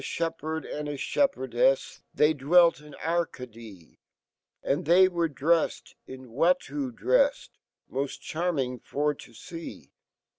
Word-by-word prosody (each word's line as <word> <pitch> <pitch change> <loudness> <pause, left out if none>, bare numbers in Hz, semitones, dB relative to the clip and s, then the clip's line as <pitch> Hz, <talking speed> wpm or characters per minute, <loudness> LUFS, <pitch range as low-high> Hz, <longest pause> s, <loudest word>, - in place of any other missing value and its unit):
fhepherd 160 -1 -3
and 150 0 -5
a 145 - -4
fhepherdefj, 390 - +1
They 150 +1 +3
dwelt 165 +5 +4
in 150 -1 -14
Arcadee, 115 - -4 0.6
And 140 - 0
fhey 180 +4 +6
were 170 -2 0
dreffed 160 +3 0
in 130 -2 -10
Watteau 180 - +1
drefs, - - +1 0.5
S\(i 140 +1 0
charming 150 -7 -2
fop 150 0 -2
to 120 - -13
fee 165 - -9
160 Hz, 115 wpm, -27 LUFS, 135-180 Hz, 0.6 s, fhey